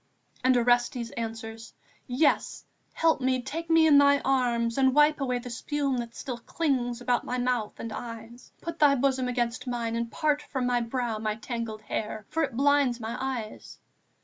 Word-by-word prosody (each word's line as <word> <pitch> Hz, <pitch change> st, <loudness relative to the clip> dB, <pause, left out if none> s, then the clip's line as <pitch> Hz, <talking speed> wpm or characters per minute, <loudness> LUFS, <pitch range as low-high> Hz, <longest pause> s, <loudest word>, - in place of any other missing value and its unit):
And 255 Hz, 0 st, +4 dB
Orestes 240 Hz, 0 st, +1 dB
answers: 225 Hz, 0 st, -6 dB, 0.3 s
'Yes, 270 Hz, +5 st, +1 dB, 0.3 s
help 325 Hz, -4 st, +2 dB
me, 255 Hz, 0 st, +1 dB
take 315 Hz, +6 st, -5 dB
me 325 Hz, -1 st, +5 dB
in 295 Hz, -3 st, +7 dB
thy 285 Hz, 0 st, +6 dB
arms, 240 Hz, -3 st, +1 dB
and 265 Hz, 0 st, +4 dB
wipe 295 Hz, 0 st, +4 dB
away 250 Hz, -2 st, 0 dB
the 245 Hz, 0 st, -7 dB
spume 275 Hz, +2 st, -1 dB
that 235 Hz, -1 st, -5 dB
still 250 Hz, -3 st, -5 dB
clings 245 Hz, -4 st, -1 dB
about 245 Hz, 0 st, +1 dB
my 250 Hz, -, -3 dB
mouth 245 Hz, -3 st, -1 dB
and 230 Hz, -1 st, -5 dB
eyes. 230 Hz, +1 st, -9 dB
Put 335 Hz, -1 st, -6 dB
thy 285 Hz, -2 st, +6 dB
bosom 260 Hz, -1 st, +1 dB
against 245 Hz, 0 st, -2 dB
mine 235 Hz, -2 st, -2 dB
and 230 Hz, 0 st, -2 dB
part 300 Hz, -2 st, +1 dB
from 265 Hz, -4 st, -3 dB
my 245 Hz, -1 st, +1 dB
brow 235 Hz, -2 st, -2 dB
my 215 Hz, -1 st, -1 dB
tangled 225 Hz, -2 st, -5 dB
hair, 215 Hz, 0 st, -4 dB
for 325 Hz, -, -1 dB
it 270 Hz, -6 st, -2 dB
blinds 280 Hz, -3 st, +3 dB
my 225 Hz, +1 st, -4 dB
eyes....' 250 Hz, -5 st, -5 dB
245 Hz, 175 wpm, -27 LUFS, 230-275 Hz, 0.3 s, in